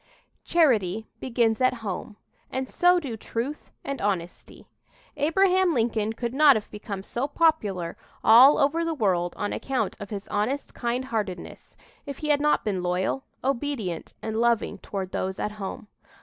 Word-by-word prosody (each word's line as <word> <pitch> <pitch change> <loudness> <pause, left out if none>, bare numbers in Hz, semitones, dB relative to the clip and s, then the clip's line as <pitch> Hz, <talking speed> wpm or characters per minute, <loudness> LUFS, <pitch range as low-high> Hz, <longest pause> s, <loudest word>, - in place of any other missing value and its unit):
"Charity 220 - +2
begins 235 -2 +1
at 255 0 +3
home" 200 +2 -4 0.3
and 260 0 -3
so 355 +4 +4
do 270 -9 -5
truth 235 +6 -5
and 275 -1 -4
honesty. 180 -4 -3 0.5
Abraham 360 +3 +3
Lincoln 225 -2 0
could 235 +1 -4
not 285 0 +7
have 215 - -4
become 205 -2 -6
so 245 +6 -2
popular 215 - +1 0.3
all 250 +6 +8
over 325 +4 +2
the 330 -1 -1
world 180 - 0
on 205 - -2
account 255 -7 -2
of 205 - -7
his 200 -2 -6
honest 245 +8 -1
kindheartedness 235 -7 -4 0.3
if 280 -1 -5
he 305 - -4
had 290 -1 +3
not 300 0 +2
been 195 -4 -1
loyal, 180 +8 -1 0.2
obedient 255 - -2
and 220 +1 -1
loving 235 -2 +1
toward 190 -2 -5
those 190 0 -2
at 210 - -2
home. 210 +3 -6
235 Hz, 150 wpm, -26 LUFS, 205-280 Hz, 0.5 s, all